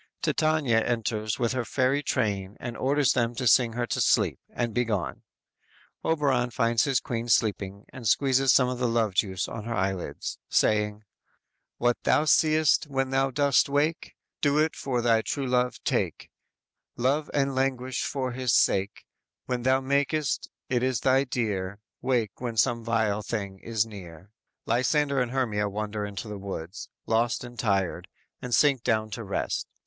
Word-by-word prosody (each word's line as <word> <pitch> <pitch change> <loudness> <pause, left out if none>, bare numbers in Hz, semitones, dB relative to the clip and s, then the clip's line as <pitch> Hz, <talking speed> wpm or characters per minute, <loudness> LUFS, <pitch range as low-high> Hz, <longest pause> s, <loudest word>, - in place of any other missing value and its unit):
"_ - - -47
Titania 155 -7 +2
enters 110 -2 -1
with 120 -2 0
her 130 -1 -1
fairy 130 +4 +1
train 100 -6 -1
and 120 -1 -5
orders 140 0 +2
them 120 -1 0
to 130 - -3
sing 120 0 +4
her 120 +1 -1
to - - -2
sleep, - - +2
and 120 -2 -3
be 125 - +2
gone. 95 - -3 0.8
Oberon 140 -6 +1
finds 115 +1 +1
his 135 -3 +2
queen 120 0 -4
sleeping 100 -3 0
and 125 -4 -5
squeezes 135 +2 +3
some 125 - +4
of 125 -1 -3
the 125 - +1
love 115 -3 +1
juice 95 -2 0
on 110 -2 -7
her 115 0 -3
eyelids, 95 -2 -3
saying: 105 -1 +2 0.8
_"What 120 0 +2
thou 150 - +2
see'st 155 -1 +3
when 135 -2 -1
thou 135 0 +2
dost 140 0 +3
awake 145 +3 -1 0.3
Do 145 0 +2
it 155 +1 +2
for 125 -3 -2
thy 115 -2 +4
true 140 +4 -3
love 125 -1 +1
take; - - -2 0.7
Love 140 +5 +1
and 140 -1 +1
languish 130 -1 -1
for 130 -2 -2
his 125 -1 -1
sake; 100 +1 +2 0.4
When 125 -1 -2
thou 130 +2 +2
makest, 140 +2 0 0.2
it 125 -2 0
is 130 -2 0
thy 135 +1 +3
dear, 100 -6 -2 0.2
Wake 120 -6 -1
when 120 -3 -4
some 115 +3 +2
vile 110 -2 0
thing 100 -3 -4
is 115 0 0
near."_ 95 -4 -11 0.4
Lysander 140 +3 +1
and 125 - -1
Hermia 110 -6 0
wander 105 0 -3
in 100 - -9
the 105 0 -6
woods, 95 -1 -7 0.2
lost 115 +2 +1
and 120 -2 -10
tired, 100 -5 0 0.3
and 125 -1 0
sink 140 -4 +3
down 110 -2 0
to 115 - -5
rest. 100 -1 -2
120 Hz, 165 wpm, -27 LUFS, 110-135 Hz, 0.8 s, sing